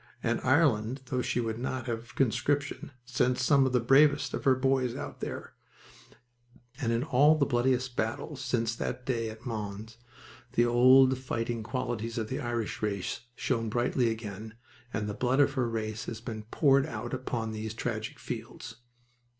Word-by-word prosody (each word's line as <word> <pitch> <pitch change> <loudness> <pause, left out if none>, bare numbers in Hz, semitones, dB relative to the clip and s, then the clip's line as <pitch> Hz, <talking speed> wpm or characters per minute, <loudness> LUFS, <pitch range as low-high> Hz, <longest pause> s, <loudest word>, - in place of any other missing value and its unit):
And - - 0
Ireland, 130 -3 +2
though 125 0 -1
she 120 - -1
would 115 -1 -2
not 130 0 -3
have 120 0 -5
conscription, 140 +3 0 0.2
sent 125 +1 +1
some 135 +1 +4
of - - -1
the 125 - +3
bravest 145 +3 +4
of - - -4
her 135 -1 +6
boys 130 -1 +1
out - - -6
there, - - -6 1.3
and 115 -6 0
in 115 +2 +1
all 145 +1 +5
the 140 - +3
bloodiest 125 0 +1
battles 130 +5 -3
since 120 -3 0
that 125 - -4
day 115 -3 -1
at 110 +3 -11
Mons 110 -1 -5 0.6
the 120 - +4
old 130 +2 +6
fighting 120 -2 -3
qualities 115 -1 -3
of 110 -2 -2
the 130 - -2
Irish 120 -2 -3
race 100 -4 -2 0.2
shone 115 -3 -1
brightly 120 +1 +1
again, 110 -1 -6 0.4
and 105 -1 -2
the 105 - -3
blood 125 +5 +1
of 140 -1 +4
her 130 -4 0
race 110 -1 -3
has 110 - -5
been 110 -2 -6
poured 140 -1 +4
out - - -5
upon 120 -3 -3
these 110 0 -5
tragic 110 -1 -3
fields. 115 -1 -7
120 Hz, 165 wpm, -29 LUFS, 110-130 Hz, 1.3 s, her